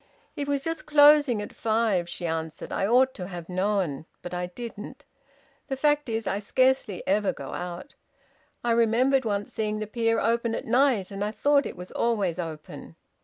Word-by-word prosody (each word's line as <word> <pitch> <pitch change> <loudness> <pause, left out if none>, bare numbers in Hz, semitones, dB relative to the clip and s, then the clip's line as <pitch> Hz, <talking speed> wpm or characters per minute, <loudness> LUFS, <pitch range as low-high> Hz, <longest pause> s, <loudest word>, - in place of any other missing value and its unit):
"It 285 - -3
was 280 -1 0
just 325 -1 -4
closing 290 -6 +6
at - - -9
five," 215 -6 0
she 175 - -5
answered. 160 -1 -4
"I 195 - 0
ought 260 +3 +4
to 180 -3 -6
have 175 -3 -7
known. 185 -6 -1 0.2
But 175 - -6
I 180 0 -2
didn't. 220 +2 -9 0.6
The 270 - -3
fact 295 -1 +2
is, 225 -1 -2
I 200 - -1
scarcely 255 -2 +1
ever 200 +1 +2
go 135 - -8
out. 180 +9 -6 0.7
I 240 - +1
remembered 235 +3 +3
once 205 -2 -2
seeing 215 -1 -1
the 215 - -3
pier 225 +1 0
open 230 0 +1
at - - -5
night, 240 -5 +2
and 195 0 -3
I 210 - 0
thought 285 +5 +2
it - - -9
was 180 +1 -9
always 200 -7 0
open." 160 -3 -7
220 Hz, 180 wpm, -26 LUFS, 185-260 Hz, 0.7 s, closing